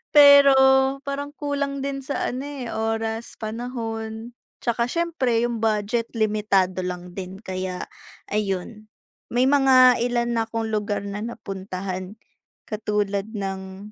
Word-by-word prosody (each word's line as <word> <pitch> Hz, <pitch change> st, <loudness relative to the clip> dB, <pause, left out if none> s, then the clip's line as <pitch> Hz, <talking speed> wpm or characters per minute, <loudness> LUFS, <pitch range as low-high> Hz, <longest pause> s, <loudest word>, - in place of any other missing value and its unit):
Pero 285 Hz, -1 st, +9 dB, 0.5 s
parang 285 Hz, +1 st, -3 dB
kulang 285 Hz, -1 st, -2 dB
din 275 Hz, 0 st, -3 dB
sa 280 Hz, +2 st, -2 dB
ano, 255 Hz, +2 st, -3 dB
eh, 280 Hz, -4 st, -6 dB
oras, 225 Hz, 0 st, -3 dB
panahon, 225 Hz, 0 st, -5 dB, 0.2 s
'tsaka 235 Hz, 0 st, 0 dB
siyempre 325 Hz, -9 st, 0 dB
yung 230 Hz, -2 st, -4 dB
budget 225 Hz, +2 st, 0 dB
limitado 210 Hz, -4 st, +1 dB
lang 180 Hz, 0 st, -6 dB
din 190 Hz, 0 st, -7 dB
kaya, 185 Hz, -2 st, -4 dB, 0.4 s
ayon. 210 Hz, +1 st, -3 dB, 0.4 s
May 245 Hz, +2 st, +3 dB
mga 260 Hz, -3 st, +6 dB
ilan 240 Hz, -1 st, 0 dB
na 225 Hz, -, +2 dB
'kong 225 Hz, -1 st, -2 dB
lugar 210 Hz, -1 st, -1 dB
na 205 Hz, +1 st, -4 dB
napuntahan, 190 Hz, -2 st, -6 dB, 0.5 s
katulad 210 Hz, -2 st, -1 dB
ng 195 Hz, -1 st, -6 dB
225 Hz, 120 wpm, -24 LUFS, 200-250 Hz, 0.5 s, Pero